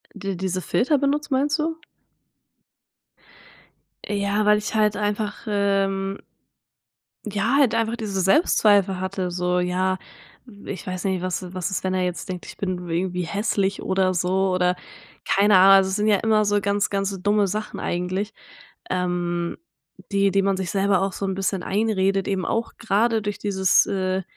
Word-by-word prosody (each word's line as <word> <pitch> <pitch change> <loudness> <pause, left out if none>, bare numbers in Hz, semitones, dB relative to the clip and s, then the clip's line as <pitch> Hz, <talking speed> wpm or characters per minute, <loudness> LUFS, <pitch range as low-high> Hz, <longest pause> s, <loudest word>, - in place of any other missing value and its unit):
Die 195 -1 -4
diese 185 0 -2
Filter 285 - +1
benutzt 285 +1 -1
meinst 285 +4 +1
du? 320 +1 -1 2.3
Ja, 205 +1 0
weil 210 0 +5
ich 210 - -4
halt 210 -1 +2
einfach, 210 +1 -3
ähm 195 -1 0 1.1
ja, 210 +5 0
halt 245 -5 +3
einfach 230 0 0
diese 205 -5 -3
Selbstzweifel 195 - +3
hatte 185 -1 -3
so, 180 0 0
ja, 185 +1 0 0.7
ich 190 - -6
weiß 185 -1 -4
nicht, 190 -2 0
was 185 0 -2
i 180 0 -9
was 185 +1 -3
ist, 190 - -2
wenn 185 0 -1
er 185 - 0
jetzt 180 0 -4
denkt, 180 -1 -5
ich - - -10
bin 180 -2 -3
irgendwie 180 +2 -1
hässlich 200 +1 -1
oder 190 0 +1
so 185 +2 +1
oder 180 0 +2 0.5
keine 200 0 +4
Ahnung. 195 +1 +8
Es 190 0 -2
sind 210 +1 0
ja 210 -2 +4
immer 215 0 +2
so 205 0 +1
ganz, 200 0 0
ganz 195 -1 -2
dumme 205 0 +2
Sachen 215 +3 -4
eigentlich, 185 +4 -2 0.6
ähm, 175 -1 -1 0.5
die 200 -1 +2
die 195 0 +3
man 195 -1 +1
sich 190 -2 -3
selber 195 -1 +2
auch 195 0 -1
so 200 - -4
'n 190 - -2
bisschen 190 -1 -2
einredet, 195 -2 0
eben 190 -2 -1
auch 230 +5 -2
grade 225 +1 +1
durch 205 0 -4
dieses 190 -2 +3
äh, 190 -1 -1
195 Hz, 165 wpm, -23 LUFS, 185-210 Hz, 2.3 s, Ahnung